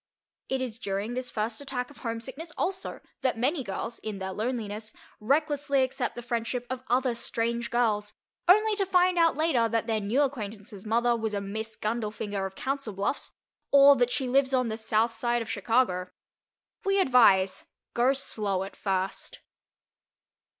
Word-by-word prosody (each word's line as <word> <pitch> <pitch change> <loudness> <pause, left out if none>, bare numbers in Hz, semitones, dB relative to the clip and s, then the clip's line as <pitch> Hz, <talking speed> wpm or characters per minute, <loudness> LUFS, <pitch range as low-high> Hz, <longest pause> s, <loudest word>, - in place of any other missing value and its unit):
It 265 0 0
is 235 -3 -4
during 200 -1 -3
this 250 0 -3
first 220 +3 -2
attack 265 -2 -4
of - - -16
homesickness 260 +8 -5
also 375 0 -2 0.2
that 260 -3 +1
many 270 +5 +1
girls, 225 +3 -4
in 215 -2 -5
their 190 0 -4
loneliness, 215 -1 -3 0.3
recklessly 280 +2 +2
accept 260 -1 -2
the 240 - -6
friendship 240 +1 -2
of 260 -1 -3
other 255 0 +2
strange 235 0 -2
girls, 215 -3 +1 0.3
only 430 +4 +5
to 395 - +2
find 360 -1 +3
out 330 -2 +4
later 275 -8 +2
that 230 0 0
their 225 -2 0
new 220 +8 +2
acquaintance's 215 -5 -5
mother 235 +2 +3
was 220 -2 -2
a - - 0
Miss 215 +2 -4
Gundlefinger 210 -3 -2
of 190 - -13
Council 270 -4 -3
Bluffs, 200 +8 -2 0.4
or 280 0 +8
that 245 0 +3
she 260 +1 -1
lives 265 +1 +3
on 255 -2 +1
the 220 - -3
south 225 +1 +1
side 240 0 0
of 225 - -6
Chicago. 200 -4 +1 0.7
We 390 0 +2
advise: 200 - +4 0.3
Go 245 +3 +3
slow 210 -8 -1
at 195 - -8
first. 190 -1 -3
235 Hz, 165 wpm, -28 LUFS, 215-265 Hz, 0.7 s, or